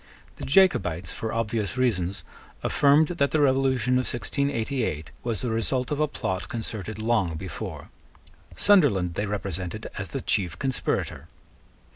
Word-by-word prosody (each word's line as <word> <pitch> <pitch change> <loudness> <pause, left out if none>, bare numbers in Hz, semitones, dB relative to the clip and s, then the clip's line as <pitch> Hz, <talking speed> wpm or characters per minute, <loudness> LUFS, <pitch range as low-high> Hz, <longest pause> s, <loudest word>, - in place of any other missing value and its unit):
The - - -6
Jacobites, 95 - +3
for 110 - -4
obvious 115 0 -1
reasons, 100 -7 0 0.4
affirmed 145 +2 +4
that 165 -5 +1
the 155 - +1
revolution 130 -3 +3
of 130 - -1
1688 120 - -2
was 115 -5 -2
the 120 - -1
result 125 +4 -1
of 145 - -1
a 155 - +3
plot 95 -9 -3
concerted 110 -4 -5
long 110 -7 +1
before. 90 +1 -6 0.7
Sunderland 125 - +4
they 100 +5 -2
represented 95 -4 -4
as - - -4
the - - -3
chief 90 -3 0
conspirator. 135 -2 -2
115 Hz, 135 wpm, -26 LUFS, 95-135 Hz, 0.7 s, affirmed